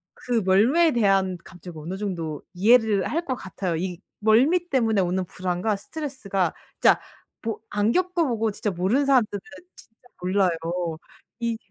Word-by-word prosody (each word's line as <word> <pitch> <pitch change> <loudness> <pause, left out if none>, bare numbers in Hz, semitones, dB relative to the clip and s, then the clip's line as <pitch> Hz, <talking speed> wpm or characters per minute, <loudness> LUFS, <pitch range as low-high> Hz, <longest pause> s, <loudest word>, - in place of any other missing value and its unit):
그 240 -3 -1
멀미에 255 - +4
대한 195 -5 +2
감정을 175 -2 -11
어느 185 +4 -5
정도 170 -7 -4
이해를 215 0 +4
할 335 +3 -1
것 260 -4 -1
같아요. 190 -4 -4
이 175 +1 -3 0.2
멀미 270 +12 +3
때문에 225 -7 +2
오는 185 +1 0
불안과 185 +4 -2
스트레스가 200 - -3 0.3
진짜 - - +6 0.4
뭐 225 -1 -3
안 210 +2 +1
겪어 360 0 +1
보고 225 -2 0
진짜 205 0 -2
모르는 195 +11 +1
사람들은 240 -7 +3 0.4
진짜 225 +2 -19
몰라요. 185 0 +2 0.9
이 230 -1 -1
210 Hz, 310 characters per minute, -24 LUFS, 185-245 Hz, 0.9 s, 진짜